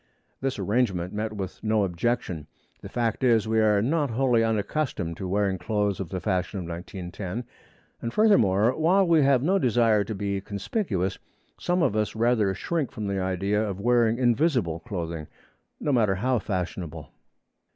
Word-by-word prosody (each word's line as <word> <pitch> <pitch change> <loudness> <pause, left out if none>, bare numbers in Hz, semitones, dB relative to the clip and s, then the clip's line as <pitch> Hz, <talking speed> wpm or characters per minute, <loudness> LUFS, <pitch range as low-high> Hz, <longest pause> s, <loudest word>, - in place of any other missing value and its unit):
This 135 0 -2
arrangement 100 -3 0
met 105 +1 -2
with 95 -3 -6
no 110 -1 +2
objection. 90 -4 -2 0.3
The - - -8
fact 120 +1 -1
is, 115 -3 +3
we 110 0 +2
are 105 -2 +3
not 145 +2 +1
wholly 120 -1 +2
unaccustomed 110 - -1
to 95 - -4
wearing 95 -1 0
clothes 105 +1 -1
of 95 -4 -4
the 95 - -3
fashion 95 +3 -1
of 90 - -5
1910, 90 +5 -6 0.6
and 115 - -3
furthermore, 120 - +4
while 180 +5 +3
we 165 -2 +5
have 135 -2 +3
no 190 +5 +3
desire 115 - +3
to 110 - -4
be 100 0 -2
conspicuous, 100 - -2 0.4
some 175 0 +1
of 105 - +1
us 110 0 -1
rather 110 -3 +2
shrink 155 - -2
from 110 - -5
the 100 -1 -1
idea 95 +3 0
of 100 -3 -4
wearing 120 +1 +3
invisible 120 - +1
clothing, 85 -7 -5 0.5
no 145 - -1
matter 110 -7 +3
how 125 +5 +1
fashionable. 85 -6 -4
105 Hz, 160 wpm, -26 LUFS, 95-125 Hz, 0.6 s, we